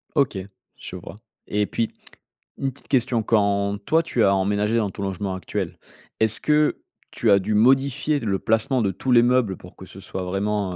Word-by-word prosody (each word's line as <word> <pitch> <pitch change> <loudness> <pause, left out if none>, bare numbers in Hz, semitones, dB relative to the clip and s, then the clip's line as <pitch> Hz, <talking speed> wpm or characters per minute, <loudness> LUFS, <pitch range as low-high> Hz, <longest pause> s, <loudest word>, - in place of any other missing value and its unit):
OK. 140 -9 +2 0.4
Je - - -8
vois 95 +2 -10 0.3
et 105 0 0
puis, 115 +2 -2 0.7
une 135 -1 -1
petite - - -12
question. 120 -3 +1
Quand 100 -2 +1
toi 165 +1 +3
tu 120 -7 0
as 100 0 +4
emménagé 105 +3 +1
dans 105 -3 +1
ton 100 - -7
logement 95 0 -3
actuel, 95 - -4 0.4
est-ce 110 -1 +1
que 150 0 +2 0.3
tu 115 - 0
as 100 - +6
dû 100 +3 -2
modifier 135 +6 +3
le 100 -6 -1
placement 110 +4 +1
de 100 -3 +1
tous 130 +6 -3
les 120 - +7
meubles 120 -5 +2
pour - - -14
que - - -10
ce - - -12
soit 95 - -5
vraiment, 95 0 -1
110 Hz, 190 wpm, -23 LUFS, 100-125 Hz, 0.7 s, les